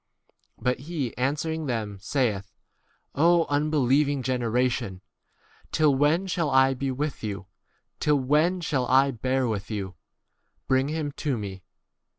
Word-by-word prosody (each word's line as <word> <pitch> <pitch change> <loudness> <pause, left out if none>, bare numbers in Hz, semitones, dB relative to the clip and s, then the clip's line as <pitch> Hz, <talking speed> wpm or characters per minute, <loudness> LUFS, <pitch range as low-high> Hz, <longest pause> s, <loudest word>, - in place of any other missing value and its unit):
But 125 +1 0
he 145 -9 -3
answering 150 +5 -1
them 110 -5 -3
saith, 105 -5 -1 0.6
O 170 +3 +4
unbeliev 145 -1 +2
ing 140 -2 -2
generation! 120 -5 0 0.7
till 155 -2 +3
when 150 +7 +2
shall 170 -4 -1
I 130 0 +4
be 135 +1 -3
with 140 +1 -3
you? 100 -3 -4 0.5
till 150 -1 +3
when 155 +7 +2
shall 135 -6 -1
I 135 +2 +4
bear 130 +2 0
with 105 -1 -3
you? 100 -4 -4 0.7
bring 130 0 +2
him 155 -1 -2
to 140 -5 0
me. 100 -3 -6
130 Hz, 135 wpm, -26 LUFS, 120-150 Hz, 0.7 s, O